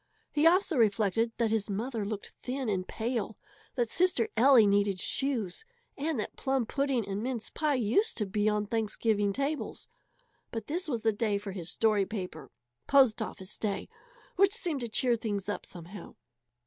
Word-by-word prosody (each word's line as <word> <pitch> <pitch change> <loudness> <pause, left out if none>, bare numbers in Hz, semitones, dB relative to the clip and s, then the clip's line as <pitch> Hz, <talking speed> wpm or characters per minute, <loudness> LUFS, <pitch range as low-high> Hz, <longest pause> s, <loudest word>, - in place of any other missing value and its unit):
He 305 +2 +4
also 360 -2 +3
reflected 220 0 +2
that 230 -2 +1
his 220 -1 0
mother 225 +2 -2
looked 205 0 -5
thin 255 -1 -3
and 185 -2 -1
pale, 225 -2 -3 0.4
that 240 -2 +1
sister 345 -4 +2
Ellie 245 -1 +7
needed 200 -1 +2
shoes, 250 - 0 0.3
and 295 -2 -2
that - - -4
plum 265 -3 0
pudding 270 -4 0
and 200 +1 -3
mince 245 -2 -3
pie 300 -2 +1
used 250 - +1
to 210 - 0
be 205 +2 +1
on 210 0 0
Thanksgiving 215 -1 0
tables. 280 +6 -3 0.6
But 225 -3 -5
this 345 +4 -2
was 235 -7 -2
the 220 -1 +3
day 205 -1 0
for 200 0 -6
his 175 -3 -6
story 210 -3 +2
paper 180 - -6 0.4
post 260 -5 +5
office 200 -2 -6
day 205 -3 -2 0.5
which 395 +2 +4
seemed 340 - -2
to 235 - -3
cheer 240 +2 +3
things 205 -4 -3
up 205 - -4
somehow. 180 +3 -10
225 Hz, 170 wpm, -30 LUFS, 205-265 Hz, 0.6 s, Ellie